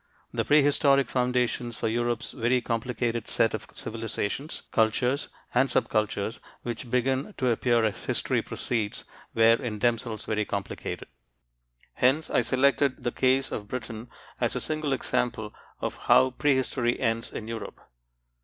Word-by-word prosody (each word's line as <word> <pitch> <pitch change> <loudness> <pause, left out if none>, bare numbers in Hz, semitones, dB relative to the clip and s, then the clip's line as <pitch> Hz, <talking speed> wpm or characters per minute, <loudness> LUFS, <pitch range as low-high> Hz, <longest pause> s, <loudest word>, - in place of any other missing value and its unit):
The - - 0
prehistoric 140 -2 +4
foundations 125 -2 0
for - - -1
Europe's 120 +1 -1
very 125 +1 +1
complicated 115 -1 -2
set 115 - +2
of 110 - -4
civilizations, 115 +5 -4
cultures, 125 +5 +2 0.3
and 130 +2 +3
sub - - +1
cultures 105 0 -1 0.2
which 120 0 -5
begin 130 - 0
to 130 -3 +2
appear 120 0 +2
as 110 - -3
history - - +1
proceeds 110 -4 -3 0.3
were 115 +1 +6
in 115 -5 -3
themselves 115 -1 0
very 105 0 0
complicated. 100 -2 -4 0.9
Hence, 140 +5 +2
I - - +4
selected 135 0 +2
the 120 - 0
case 130 +2 +2
of 105 - -4
Britain 115 0 -6 0.3
as - - +1
a - - 0
single 155 -2 -2
example 115 -4 -1 0.3
of - - -3
how 130 0 +4
prehistory 130 -3 +1
ends 115 -2 0
in 110 - -6
Europe. 115 -1 -6
120 Hz, 140 wpm, -27 LUFS, 115-130 Hz, 0.9 s, were